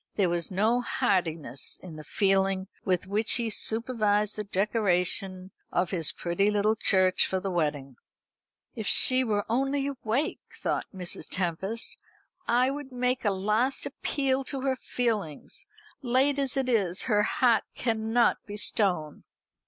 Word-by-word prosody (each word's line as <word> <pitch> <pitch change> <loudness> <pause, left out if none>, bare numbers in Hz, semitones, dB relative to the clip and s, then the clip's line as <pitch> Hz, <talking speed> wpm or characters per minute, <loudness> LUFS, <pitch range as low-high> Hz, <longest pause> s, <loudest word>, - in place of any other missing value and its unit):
There 195 -4 +2
was 170 -1 -1
no 220 +6 +2
heartiness 165 - -1
in 175 -4 -9
the 155 - -9
feeling 195 +1 +1 0.2
with 185 -2 0
which 210 +4 +2
he 230 -2 +1
supervised 215 -2 0
the 210 - -3
decoration 190 -2 -1 0.2
of 175 0 0
his 165 -6 +2
pretty 175 +4 0
tittle 210 +1 +2
church 185 -4 +3
for 190 - -1
the 195 +1 -3
wedding. 145 -6 -2 0.8
"If 220 -5 -5
she 255 0 +5
were 210 -4 0
only 270 +4 0
awake," 275 +1 -2 0.2
thought - - -2
Mrs. 180 -3 -5
Tempest, 190 +5 -2 0.5
"I 250 +3 +3
would 280 -1 -7
make 250 +1 -1
a 205 - +2
last 215 +7 0
appeal 270 -1 -1
to 270 -1 -3
her 265 0 0
feelings, 235 - -3 0.3
late 270 +2 +2
as 275 -1 0
it 265 -1 0
is. 200 -7 +1
Her 210 -4 +2
heart 240 0 +2
cannot 225 0 +1
be 205 0 -6
stone." 180 -8 0
210 Hz, 145 wpm, -27 LUFS, 185-245 Hz, 0.8 s, she